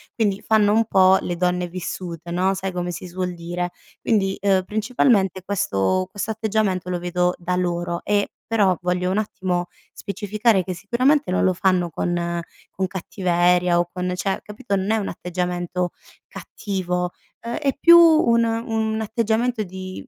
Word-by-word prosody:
quindi 205 -4 0
fanno 210 -2 +3
un 225 +1 +3
po' 190 -2 +5
le 175 - -3
donne 180 0 0
vissute 175 -1 -6
no, 185 +2 +1
sai 190 0 -3
come 180 0 -3
si 175 +2 -7
suol 180 0 -3
dire. 175 +1 -4 0.3
Quindi, 195 -4 +1
uhm, 195 -2 +3
principalmente 210 -2 +1
questo 185 - 0
questo 205 +3 -4
atteggiamento 210 -4 -1
lo 180 - -1
vedo 180 0 0
da 180 +1 -2
loro, 175 -1 -2
e, 205 -1 +1 0.2
però, 200 -6 +2
voglio 180 +1 0
un 200 - 0
attimo 185 -4 -1 0.3
specificare 205 +1 0
che 185 - -4
sicuramente 250 - +1
non 185 - +1
lo 185 - +4
fanno 180 -2 +1
con 170 +1 -2 0.3
con 190 0 -2
cattiveria 180 -1 +1
o 175 0 0
con 180 0 -3
cioè 195 +1 -1
capito, 210 -1 -3
n 190 +1 -2
è 220 - +3
un 210 -3 -2
atteggiamento 180 0 -3 0.3
cattivo, 180 -3 -4 0.3
uhm, 235 - -4
è 280 -3 0
più 340 +3 +8
un 310 -9 +5
un 225 -1 -1
atteggiamento 225 +2 0
di 185 0 -8
185 Hz, 160 wpm, -22 LUFS, 180-215 Hz, 0.3 s, più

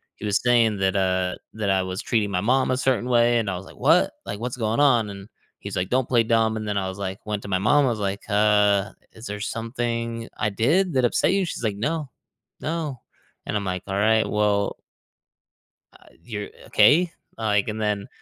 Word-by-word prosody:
he - - -8
was 105 -1 +1
saying 115 -3 +3
that, 95 0 +1
uh, 95 -1 0 0.2
that 105 -2 -2
I 95 -1 +3
was 95 +1 -4
treating 110 -4 0
my 90 -2 -1
mom 130 +5 +2
a - - +2
certain 130 -2 0
way 120 -1 +4
and 110 - -2
I 95 - -2
was, 95 - -9
like, - - -15
"What, - - +4
like 100 - -5
what's 125 +1 -4
going 115 +3 0
on?" 120 -7 +4
And 100 +1 -10 0.3
he's, - - -7
like, 90 0 0
"Don't 130 0 0
play 120 -2 +4
dumb," 110 -1 +2
and 110 -1 -5
then 105 -1 -1
I 95 -1 -1
was, 95 - -7
like 95 -1 -5
went 105 -1 -3
to - - -8
my 95 - +2
mom, 140 +8 +4
I - - +2
was, 115 -3 -2
like, 100 0 -3
"Uh, 105 -1 +3 0.2
is 110 - -12
there 105 0 -5
something 115 +1 -3
I 105 - 0
did 155 - +2
that 130 -1 +3
upset 120 - +2
you?" 195 -1 +1
She's, 165 - -6
like, 105 -3 -1
"No. 150 +5 -2 0.5
No." 155 -5 -3 0.4
And - - -3
I'm 100 - -3
like, 90 0 -3
"Alright, 110 +3 +2
well" 105 -1 +1 1.2
"uh, - - -22 0.2
you're 105 -4 -5 0.2
okay," 170 +3 +4 0.3
uh, 110 - -7
like, 105 -2 +2
and 110 0 -3
then 105 -2 -1
110 Hz, 215 wpm, -24 LUFS, 100-120 Hz, 1.2 s, way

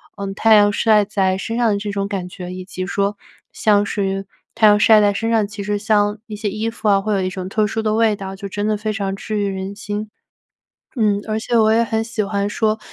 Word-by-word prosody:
呃， 200 - -5
太 220 +2 +4
阳 205 -1 +5
晒 215 0 +3
在 195 -2 0
身 225 +4 -4
上 240 -2 +2
的 200 - +1
这 205 0 -4
种 200 0 -2
感 190 -3 -4
觉， 180 0 -8
以 185 0 -7
及 185 0 -6
说 200 +1 -1 0.3
像 205 -1 +2
是 195 -1 -2 0.3
太 220 - +5
阳 210 0 +5
晒 215 0 +6
在 205 -1 +3
身 225 +3 -2
上， 225 -2 +2
其 205 0 -8
实 205 +1 -1
像 210 0 +1
一 215 - -6
些 210 -1 -2
衣 215 +3 -2
服 225 -1 -5
啊 195 -1 +4
会 210 +1 -1
有 195 - +1
一 185 - -1
种 185 0 -6
特 215 +1 +1
殊 225 +1 -2
的 215 -1 +1
味 225 -1 +3
道， 195 -1 -7
就 200 - -6
真 205 +1 -3
的 215 -1 +1
非 215 +1 -3
常 200 -2 -2
治 215 +1 -4
愈 205 - 0
人 190 0 -4
心。 210 +1 -5 0.9
嗯， 210 -3 +2
而 215 0 -1
且 235 +1 0
我 220 -1 +4
也 230 +1 +3
很 225 -1 -1
喜 230 -2 -2
欢 200 0 -1
说 215 +1 0
205 Hz, 270 characters per minute, -19 LUFS, 200-215 Hz, 0.9 s, 晒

